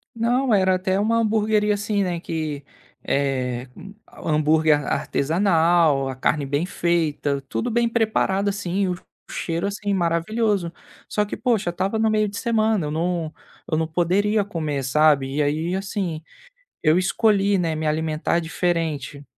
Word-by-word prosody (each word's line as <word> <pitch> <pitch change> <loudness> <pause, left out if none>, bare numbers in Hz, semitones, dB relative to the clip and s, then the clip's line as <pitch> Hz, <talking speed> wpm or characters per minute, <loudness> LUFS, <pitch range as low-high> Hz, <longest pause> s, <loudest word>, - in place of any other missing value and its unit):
Não, 240 +2 +1
era 190 -2 +3
até 185 +1 0
uma 225 +3 +2
hamburgueria 215 -1 +2
assim, 205 0 -1
né, 175 -2 -2
que, 155 -4 -4 0.4
eh, 130 -3 -1 0.6
hambúrguer 155 0 +3
ar - - -4
artesanal, 165 -3 +2
a 130 - -5
carne 145 +3 0
bem 145 +4 -1
feita, 160 -6 0
tudo 235 - -2
bem 235 0 +2
preparado 215 -4 +1
assim, 195 -1 -1
o 180 - -1 0.3
cheiro 170 +3 -2
assim 205 0 -2
maravilhoso. 185 +2 0 0.4
Só 210 - 0
que 205 - -6
poxa, 230 -8 0
estava 190 +5 -1
no 220 0 +3
meio 215 -1 +2
de 205 0 -6
semana, 220 -6 +1
eu - - -4
não 165 0 -2 0.4
eu 155 - +2
não 160 0 0
poderia 195 +6 +1
comer 155 -8 -3
sabe. 140 0 +3
E 150 - +1
aí 160 +5 -1
assim, 190 -4 -3 0.6
eu 155 +1 +4
escolhi, 200 +1 +2
né, 170 -3 0
me 155 0 -2
alimentar 155 +2 0
diferente. 160 -4 -2
175 Hz, 150 wpm, -23 LUFS, 155-205 Hz, 0.6 s, eu